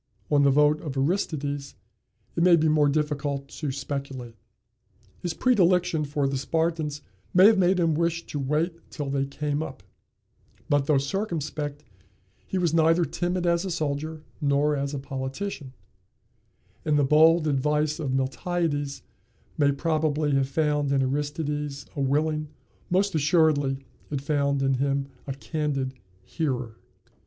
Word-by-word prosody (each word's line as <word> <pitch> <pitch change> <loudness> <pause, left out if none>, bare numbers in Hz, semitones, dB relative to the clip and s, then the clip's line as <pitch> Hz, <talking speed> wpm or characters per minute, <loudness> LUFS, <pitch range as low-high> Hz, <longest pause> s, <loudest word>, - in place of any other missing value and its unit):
On 145 -1 +5
the 140 - +5
vote 150 +2 +4
of 140 -4 -5
Aristides 145 -3 -1 0.6
it 165 - 0
may 175 0 +7
be 160 -1 +2
more 150 -1 +4
difficult 145 -2 -1
to 150 -2 -4
speculate. 135 -3 -5 0.9
His 175 -2 -3
predilection 180 -9 +3
for 145 -1 0
the 135 -1 -1
Spartans 155 0 -1 0.3
may 185 +2 +8
have 215 -1 +6
made 185 0 +3
him 165 -2 +3
wish 170 +1 0
to 145 - -5
wait 160 +5 -2
till 145 -3 -4
they 135 0 0
came 145 +1 -2
up; 135 -11 -7 0.8
but, 145 -1 +2
though 150 - +4
circumspect, 150 -2 -3 0.6
he 190 - -2
was 175 -3 +1
neither 165 +1 +4
timid 175 +4 -2
as 170 0 +2
a 195 - -3
soldier 155 -1 -3 0.2
nor 145 +1 +2
as 140 +1 -2
a - - -2
politician, 135 +3 -5 1.1
and 150 -1 +2
the 145 - +3
bold 155 +3 +5
advice 150 +2 +1
of 150 -4 -2
Miltiades 145 +2 -1 0.5
may 145 -2 +3
probably 155 0 0
have 135 -1 +2
found 150 -1 +1
in 135 -1 +3
Aristides 145 +1 -2
a 145 - -2
willing, 150 +3 +1 0.4
most 195 +3 +2
assuredly 145 -4 +2 0.2
it 145 - -2
found 140 -1 0
in 135 0 +2
him 140 0 0 0.2
a 135 - -2
candid, 140 -3 -2 0.3
hearer. 125 - -3
150 Hz, 145 wpm, -26 LUFS, 140-160 Hz, 1.1 s, may